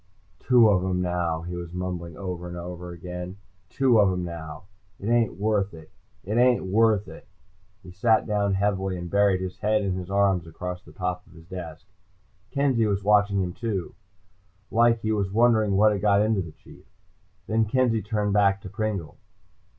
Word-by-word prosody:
"Two 125 -3 +5
of 95 -4 +3
'em 95 -1 -1
now," 90 -2 -1
he 90 +1 -6
was 85 -1 -7
mumbling 90 -3 -5
over 90 -2 -5
and 90 0 -7
over. 90 0 -7 0.7
"Two 130 -4 +3
of 100 -2 +4
'em 90 -1 -2
now. 80 -2 -8 0.4
It 100 - -4
ain't 115 -4 +2
worth 100 -3 0
it. 80 -1 -14 0.3
It 105 +5 -1
ain't 125 -4 +3
worth 105 +1 +2
it." - - -12 0.6
He 90 - -11
sat 110 +4 +2
down 100 -2 0
heavily 95 -1 0
and 85 -1 -7
buried 100 -2 +3
his 95 0 -6
head 105 +1 +1
in 95 -2 -1
his 90 0 -5
arms 95 -4 +2
across 90 +2 -6
the - - -16
top 90 -2 -4
of - - -19
his 80 0 -15
desk. 85 -3 -8 0.6
Kenzie 130 -4 +1
was 100 -1 -1
watching 100 -1 +3
him 90 -1 -4
too, 105 -6 -4 0.8
like 115 0 +3
he 110 - -1
was 100 -3 0
wondering 110 -3 +3
what 105 +1 +5
had 100 -2 -2
got 100 0 +4
into 110 -2 +1
the 85 -3 -7
Chief. - - -18 0.6
Then 110 0 +1
Kenzie 115 -1 +1
turned 105 -1 -1
back 100 -1 +3
to 95 - -8
Pringle. 100 -7 -4
100 Hz, 180 wpm, -25 LUFS, 90-110 Hz, 0.8 s, Two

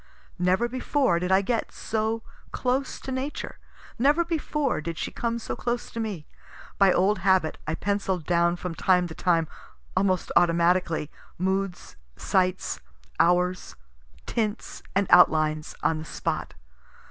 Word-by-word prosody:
Never 185 +6 +2
before 255 - +1
did 180 +1 -2
I 190 +1 +4
get 230 +2 -1
so 220 +1 -2 0.3
close 260 +2 -1
to 265 - -6
Nature; 260 +3 -4 0.4
never 295 +7 +3
before 300 - -1
did 165 0 -5
she - - -3
come 235 0 -2
so 235 - -4
close 240 0 -3
to 230 - -5
me. 205 -9 -4 0.5
By 195 -2 +6
old 190 +3 +2
habit, 185 -3 +2
I 160 - 0
pencill'd 195 -4 -1
down 170 0 +2
from 180 -1 -5
time 180 +2 +3
to - - -7
time, 165 -2 +1 0.5
almost 185 -1 +1
automatically, 170 -2 +2 0.3
moods, 190 0 -2 0.2
sights, 185 -1 0 0.4
hours, 180 +1 +2 0.5
tints 215 -2 -3
and 200 +1 +3
outlines, 155 -3 +4
on 160 -1 +1
the 155 - -7
spot. - - -3
185 Hz, 135 wpm, -26 LUFS, 175-225 Hz, 0.5 s, By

